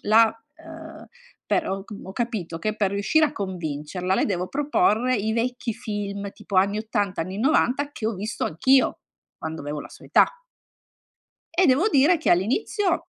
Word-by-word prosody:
la, 225 +2 +6 0.4
ehm, 320 -1 -11 0.4
per - - +1
ho 195 0 -3
c 215 - -12
ho 190 - -8
capito 200 -8 -3
che 215 +5 -2
per 200 -3 +1
riuscire 205 +11 +3
a 290 - -6
convincerla 180 - -3
le - - +2
devo 180 -2 -1
proporre 275 -4 +2
i 215 +1 -1
vecchi 245 0 -1
film 200 -1 -4
tipo 200 - -6
anni 200 +3 +3
'80, 205 -4 -1
anni 185 +4 -6
'90 280 +2 +2
che 215 - -4
ho 225 - -1
visto 210 +4 -3
anch'io, 260 +12 +2 0.4
quando 160 0 -5
avevo 145 +1 -4
la - - -9
sua - - -14
età. - - +5 1.3
E 370 - +5
devo 290 +12 +4
dire 310 +1 +4
che 310 - -1
all'inizio 335 - +1
215 Hz, 170 wpm, -24 LUFS, 190-270 Hz, 1.3 s, la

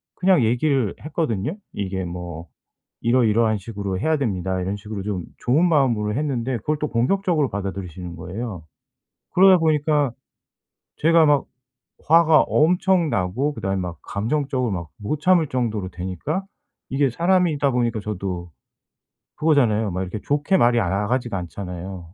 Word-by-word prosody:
그냥 180 -8 +3
얘기를 125 0 +1
했거든요. 150 - -2 0.2
이게 95 -1 -3
뭐 85 -1 -7 0.5
"이러이러한 115 -2 +3
식으로 100 -2 -4
해야 160 +4 +1
됩니다." 95 -7 -1
이런 95 +3 -2
식으로 105 0 -6
좀 100 -4 -3 0.2
좋은 150 +9 +3
마음으로 120 -8 +2
했는데 130 -4 -1
그걸 150 +7 -1
또 150 - -1
공격적으로 155 +4 +1
받아들이시는 95 -3 -5
거예요. 90 +1 -6 0.7
그러다 190 0 +7
보니까 150 -4 +2 0.9
제가 165 0 +5
막 145 -2 +3 0.6
화가 165 -1 +6
엄청 175 0 +2
나고 115 +9 0
그다음에 95 -2 -2
막 90 -3 -5
감정적으로 125 +2 -1
막 85 -3 -4
못 140 +9 -3
참을 175 -3 +3
정도로 110 -8 -2
되니까 95 - -4 0.5
이게 135 0 +2
사람이다 170 -2 +2
보니까 120 -3 0
저도 90 -4 -5 0.9
그거잖아요 120 - +2
막 90 - -3
이렇게 95 +4 -5
좋게 145 +6 +1
말이 120 -5 +4
아 90 - 0
나가지가 110 +3 -1
않잖아요. 90 -1 -7
115 Hz, 340 characters per minute, -22 LUFS, 95-150 Hz, 0.9 s, 그러다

